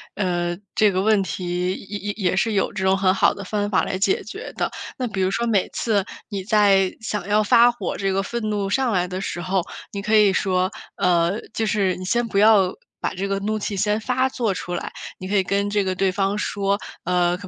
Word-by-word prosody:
呃， 175 -3 -1 0.2
这 210 -2 +4
个 185 - 0
问 215 0 +3
题 180 0 -2
也 200 +2 -6
也 205 0 -3
也 185 -4 0
是 225 +3 +1
有 195 - +1
这 190 - -4
种 190 0 +3
很 185 -1 +3
好 195 - +3
的 200 - -8
方 205 +1 -2
法 200 - +2
来 185 - -2
解 305 - +1
决 - - -8
的。 - - -1 0.3
那 255 - -2
比 205 -4 -3
如 185 - +2
说 235 +4 0
每 210 -5 +2
次 205 -4 0 0.2
你 195 -3 -4
在 200 -3 +3
想 210 -4 -3
要 210 +1 +3
发 235 +4 +6
火 240 - -4
这 195 -1 0
个 195 +1 +1
愤 235 +3 -4
怒 205 -2 -1
上 255 +3 +1
来 180 -1 +2
的 180 +1 -4
时 175 -3 -4
候， 185 0 0 0.3
你 200 - -4
可 215 +2 +1
以 210 -2 +6
说， 185 -1 +1 0.2
呃， 175 +3 +2
就 225 - -1
是 195 -3 +1
你 185 - -7
先 240 +5 +1
不 200 - -3
要 200 -3 +5 0.3
把 - - 0
这 195 +1 -3
个 195 0 -1
怒 215 +2 -2
气 205 0 -3
先 210 +2 +1
发 255 +3 +1
作 230 -6 -1
出 180 -1 -5
来， - - -5 0.2
你 185 - -7
可 205 - -1
以 190 - +4
跟 200 +2 0
这 205 0 +1
个 185 -1 -1
对 190 +1 +2
方 195 +1 0
说， 200 -1 0 0.3
呃， 175 0 +2
可 200 - -10
195 Hz, 255 characters per minute, -22 LUFS, 185-210 Hz, 0.3 s, 发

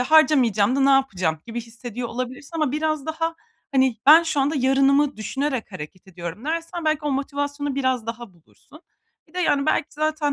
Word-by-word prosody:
harcamayacağım 255 -6 +4
da - - +1
ne 275 +1 +4
yapacağım?" 185 - +1
gibi 235 +1 -4
hissediyor 235 +1 -7
olabilirsin 255 +4 -6
ama 305 -5 0
biraz 310 -1 -1
daha, 325 +1 -2 0.4
hani, 260 -3 +3
"Ben 315 +4 +9
şu 315 -4 0
anda 280 +3 +1
yarınımı 275 +2 +3
düşünerek 260 +1 -3
hareket 175 +2 -9
ediyorum." 175 +4 -7
dersen 330 +2 -3
belki 310 -1 +2
o 295 - 0
motivasyonu 285 +1 -2
biraz 260 -4 0
daha 230 -2 -6
bulursun. 175 - -20 0.5
Bir 315 - -26
de, - - -4
yani, 285 -5 +1
belki 310 - +2
zaten, 305 -1 -1
275 Hz, 175 wpm, -23 LUFS, 235-305 Hz, 0.5 s, Ben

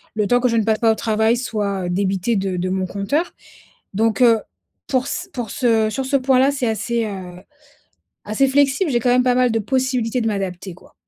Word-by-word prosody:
le 210 -1 0
temps 245 0 +3
que 250 - +2
je 230 - 0
ne 220 - +2
passe 220 0 +1
pas 225 -1 +4
au - - +1
travail 220 +2 +1
soit 200 -6 -3
débité 195 +4 0
de 190 -1 -2
de 185 +1 -2
mon 190 0 -1
compteur. 245 - -2 0.6
Donc, 225 +3 +1
heu, 230 -3 +5 0.5
pour 260 0 0
c 360 - -4
pour 240 -4 -4
ce 225 -3 +1
sur 265 +3 -3
ce 275 +1 +1
point 260 -1 +2
là, 270 +2 +4
c'est 270 -4 -2
assez, 230 +1 -1
heu, 185 -3 -7 0.9
assez 215 +6 +1
flexible, 285 +4 +2
j'ai 240 - +2
quand 245 - 0
même 250 0 +4
pas 250 -1 +3
mal 250 -1 +3
de 225 - +1
possibilités 255 0 -1
de 225 - -2
m'adapter, 190 -3 -3
quoi. - - -20
225 Hz, 215 wpm, -20 LUFS, 200-255 Hz, 0.9 s, heu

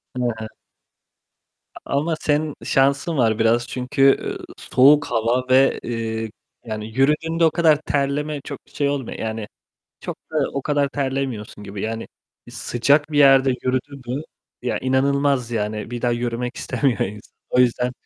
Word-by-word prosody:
Hı 125 - -2 0.2
hı. 110 - -5 1.3
A - - -9 0.2
ama 160 +2 0
senin 150 -1 0
şansın 140 +4 +2
var 110 -3 +2
biraz 120 +2 +2
çünkü, 125 +2 -3
üüü, 135 0 +4 0.2
soğuk 145 +3 +5
hava 120 +2 0
ve, 135 +1 +4
eee, 115 -1 -3 0.4
yani 110 -1 -5
yürüdüğünde 160 +4 +2
o 160 - +4
kadar 160 -3 +4
terleme 145 +1 -1
çok 140 -1 -7
şey 140 -1 -1
olmuyor. 140 -4 -4
Yani 110 -1 -4 0.5
çok - - -5
da 155 - -4 0.2
o 140 - -3
kadar 145 -2 +1
terlemiyorsun 130 -7 -3
gibi 100 0 -6
yani. 115 +1 -4 0.4
Sıcak 140 +6 +1
bir 145 - +1
yerde 135 -1 +6
yürüdün 130 +2 -2
mü, 150 - -4 0.4
ya 125 - -1
inanılmaz 135 -1 +1
yani, 105 0 -3
bir 120 -1 -5
daha 120 -1 +2
yürümek 120 +1 -3
istemiyor 130 -7 0
insan, 105 +1 -4 0.2
o 125 - +1
yüzden. 125 0 +2
130 Hz, 150 wpm, -22 LUFS, 115-140 Hz, 1.3 s, yerde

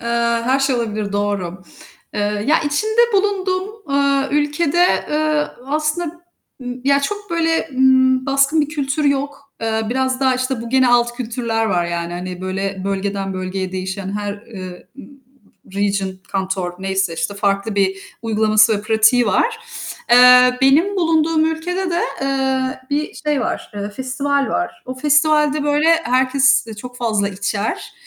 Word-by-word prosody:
Eee, 235 - -7 0.4
her 260 +3 +2
şey 270 -2 +1
olabilir, 215 -3 -3
doğru. 200 -3 -2 0.5
Eee, 205 0 -1
ya 310 +3 +3
içinde 430 +10 0
bulunduğum, 385 -1 0 0.2
eee, 275 0 +1
ülkede, 295 +4 +1
eee, 305 0 +1 0.2
aslında 310 +3 -2 0.4
ı - - -10 0.2
ya 280 0 +3
çok, 410 +4 -4
böyle, 330 -1 0
ımm, 260 0 +3
baskın 275 +3 +3
bir 295 - 0
kültür 295 -1 -2
yok. 280 0 -2
Eee, 220 0 -1
biraz 260 0 -1
daha, 260 -1 +3
işte, 255 -1 -2
bu 235 - -7
gene 260 0 +3
alt 240 0 +3
kültürler 230 -2 -2
var 175 -4 +1
yani, 170 0 -3
hani, 180 0 -6
böyle, 190 0 -3
bölgeden 195 0 -2
bölgeye 185 0 -4
değişen, 190 +1 -4
her, 205 -1 -3
eee, 185 -5 -9
ı - - -7 0.7
region, 200 -1 0 0.2
kanton 190 -2 -2
neyse 190 -2 -1
işte 165 +5 -3
farklı 200 +1 -1
bir 195 -1 +1 0.3
uygulaması 215 -1 +3
ve 205 - -8
pratiği 220 +2 +3
var. 460 - +1 0.5
Eee, 250 +1 +7
benim 310 +10 +3
bulunduğum 325 -2 +2
ülkede 355 +3 -2
de, 340 - 0 0.2
eee, 265 -1 -1
bir 295 +2 -2
şey 295 -3 -1
var, - - -3
eee, 205 0 -4
festival 275 +2 -1
var. 90 0 -3
O 255 - -5
festivalde 300 +1 +2
böyle 295 +2 +2 0.2
herkes 260 +1 +3
çok 250 +1 -9
fazla 215 -5 0
içer, 200 +2 -3
255 Hz, 150 wpm, -19 LUFS, 200-295 Hz, 0.7 s, Eee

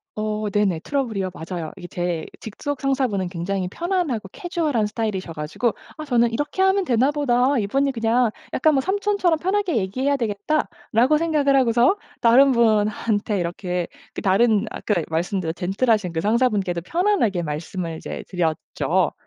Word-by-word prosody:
어 215 0 -2
네네 200 -4 +1
트러블이요. 230 -10 -1
맞아요. 165 -1 -6
이게 175 - -8
제 175 -2 -3 0.2
직속 270 +6 -5
상사 270 -1 +1
분은 195 -5 -2
굉장히 185 +1 -3
편안하고 335 - -2
캐주얼한 320 - -1
스타일이셔 210 -5 -3
가지고 160 +10 -1 0.3
아 310 - -5
저는 240 -5 +2
'이렇게 290 +9 -2
하면 385 +1 +3
되나 260 -2 +2
보다 275 -2 +2
이분이 270 +6 +1
그냥 230 +1 +2 0.2
약간 310 +3 +3
뭐 270 - +2
삼촌처럼 390 -1 +1
편하게 380 - 0
얘기해야 255 +8 0
되겠다.'라고 235 +3 0
생각을 300 -4 +2
하고서 245 - +4 0.2
다른 265 +4 +6
분한테 215 -2 +1
이렇게 180 0 -2 0.3
그 - - -5
다른 210 +2 +3
아까 210 - -2
말씀드린 170 +1 -1
젠틀하신 195 +2 +1
그 165 - -2
상사분께도 205 -4 +1
편안하게 320 - +1
말씀을 165 +2 -4
이제 - - -7
드렸죠. 165 -4 0
225 Hz, 375 characters per minute, -22 LUFS, 190-280 Hz, 0.3 s, 다른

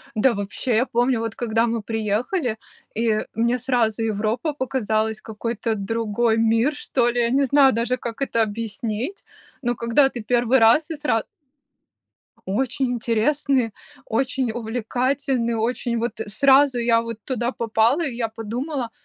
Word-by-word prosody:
Да, 235 +3 +3
вообще, 205 +4 -2
я 245 - +3
помню, 245 -1 +1
вот 225 -1 -4
когда 230 0 +1
мы 230 -1 -1
приехали, 225 - -1 0.4
и 220 -1 +1
мне 235 +2 +1
сразу 230 -3 0
Европа 225 +7 -1
показалась- 220 -5 -1
какой-то 225 +1 -3
другой 225 +2 0
мир, 225 +6 +2
что 245 -4 0
ли, 240 0 0
я 235 - +2
не 275 +3 +2
знаю 270 0 +5
даже, 240 +3 0
как 235 +1 -7
это 230 -4 +1
объяснить, 225 - -3 0.4
но 240 -2 0
когда 235 +4 +3
ты 240 - -7
1 240 +3 +2
раз 235 +9 +5
и 320 - -3
сразу 250 -7 0 1.2
Очень 255 +5 0
интересный, 240 +1 +1 0.3
очень 255 0 -1
увлекательный, 245 +2 -1
очень 235 +1 -1
вот 230 -1 -3
сразу 265 +4 +4
я 230 -1 +3
вот 230 -2 -7
туда 245 -1 -1
попала. 230 +6 +1
И 255 -5 -4
я 235 -2 -1
подумала: 240 +4 -4
235 Hz, 145 wpm, -22 LUFS, 225-260 Hz, 1.2 s, знаю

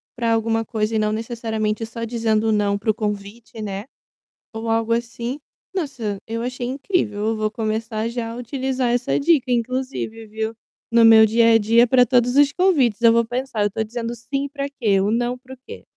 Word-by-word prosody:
para 235 -1 0
alguma 225 0 0
coisa 220 -1 -2
e - - +2
não 215 0 +1
necessariamente 225 -1 -2
só 230 +1 -7
dizendo 225 -1 0
"não" 205 -1 +1
para 210 +2 -4
o - - -4
convite, 215 +2 -5
né, 200 0 -5 0.7
ou 225 +1 -4
algo 225 0 +1
assim, 240 +3 -3 0.4
nossa, 260 - -3
eu 230 +1 -4
achei 245 0 -4
incrível. 270 - -1
Eu 225 - +1
vou 215 0 -1
começar 220 0 -2
já 235 -1 -4
utilizar 255 0 -2
essa 245 0 0
dica 280 -4 +2
inclusive, 240 -2 -2
viu, 220 +1 -4 0.4
no 235 0 +5
meu 225 -1 +8
dia 230 +1 +4
a - - +7
dia 230 +3 +4
para 250 0 +5
todos 245 +1 +2
os 285 -1 +5
convites. 285 - +2
Eu 230 - +7
vou 235 0 +3
pensar: 245 -1 -3
"Eu 205 - +3
estou 215 +2 -2
dizendo 230 +1 -5
"sim" 275 +4 -3
para 280 -1 -4
quê? 215 -8 +1
O 205 - +1
"não" 240 +2 0
para 260 +1 -13
o 265 - -12
quê?" - - -9
230 Hz, 195 wpm, -21 LUFS, 220-250 Hz, 0.7 s, meu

